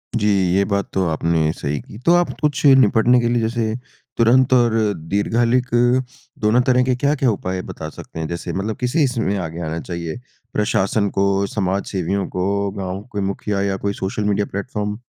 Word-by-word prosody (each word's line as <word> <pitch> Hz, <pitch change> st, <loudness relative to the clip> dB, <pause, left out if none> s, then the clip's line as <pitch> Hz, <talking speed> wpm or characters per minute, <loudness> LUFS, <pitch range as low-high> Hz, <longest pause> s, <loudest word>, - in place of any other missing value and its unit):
जी, 105 Hz, -2 st, +1 dB, 0.3 s
ये 100 Hz, -, +4 dB
बात 100 Hz, -1 st, -1 dB
तो 95 Hz, -1 st, +1 dB
आपने 80 Hz, 0 st, +1 dB
सही 70 Hz, -3 st, -3 dB
की। 105 Hz, -, -12 dB
तो 170 Hz, -, +5 dB
आप 175 Hz, 0 st, +2 dB
कुछ 150 Hz, -1 st, 0 dB
निपटने 125 Hz, -3 st, +5 dB
के 120 Hz, -, +1 dB
लिए 120 Hz, 0 st, +1 dB
जैसे 110 Hz, -1 st, -1 dB, 0.4 s
तुरंत 125 Hz, +3 st, +4 dB
और 120 Hz, -3 st, +4 dB, 0.3 s
दीर्घकालिक 115 Hz, +6 st, +1 dB, 0.8 s
दोनों 110 Hz, +4 st, +4 dB
तरह 125 Hz, 0 st, +4 dB
के 130 Hz, 0 st, +1 dB
क्या-क्या 140 Hz, 0 st, +1 dB
उपाय 95 Hz, -2 st, -3 dB
बता 85 Hz, -5 st, -7 dB
सकते 80 Hz, -, -10 dB
हैं? 80 Hz, -, -2 dB
जैसे 85 Hz, 0 st, -5 dB
मतलब 105 Hz, +3 st, -3 dB
किसे 130 Hz, +6 st, +1 dB
इसमें 115 Hz, -6 st, 0 dB
आगे 85 Hz, -2 st, -5 dB
आना 80 Hz, 0 st, -3 dB
चाहिए 85 Hz, 0 st, -5 dB, 0.4 s
प्रशासन 100 Hz, 0 st, +1 dB
को? 100 Hz, 0 st, +1 dB
समाज 95 Hz, 0 st, -1 dB
सेवियों 95 Hz, +1 st, -1 dB
को, 100 Hz, +2 st, -1 dB
गाँव 95 Hz, -1 st, -5 dB
के 100 Hz, -, 0 dB
मुखिया 100 Hz, +1 st, -2 dB
या 100 Hz, -1 st, 0 dB
कोई 100 Hz, +1 st, -2 dB
सोशल 95 Hz, +2 st, -3 dB
मीडिया 105 Hz, 0 st, +1 dB
प्लेटफ़ॉर्म? 105 Hz, 0 st, -3 dB
100 Hz, 180 wpm, -20 LUFS, 95-120 Hz, 0.8 s, तो